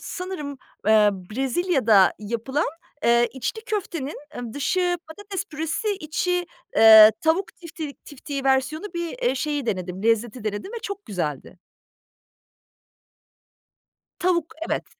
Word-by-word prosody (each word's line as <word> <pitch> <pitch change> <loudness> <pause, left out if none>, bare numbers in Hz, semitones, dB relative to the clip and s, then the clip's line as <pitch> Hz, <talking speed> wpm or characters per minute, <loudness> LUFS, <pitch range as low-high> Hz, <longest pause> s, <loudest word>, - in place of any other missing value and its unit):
sanırım, 330 -7 -6 0.3
ııı, 215 -1 +6 0.2
Brezilya'da 260 - +3
yapılan, 235 +8 -2 0.4
ııı, 235 0 +5
içli 270 - -4
köftenin 345 - -3 0.3
dışı 355 +5 0
patates 400 +2 -5
püresi 320 +7 -3
içi, 355 +3 -1 0.3
ııı, 220 -1 +10
tavuk 335 +3 0
tiftik 325 -4 -8
tiftiği 285 -1 -6
versiyonu 270 +5 +1
bir, 340 +7 -4
eee, 375 - +2
şeyi 290 -1 -2
denedim, 185 -2 -3
lezzeti 230 +1 0
denedim 215 - -4
ve 470 - -4
çok 400 0 -6
güzeldi. 170 -3 -4 2.6
Tavuk, 345 -3 0
evet. - - -1
285 Hz, 110 wpm, -24 LUFS, 230-350 Hz, 2.6 s, ııı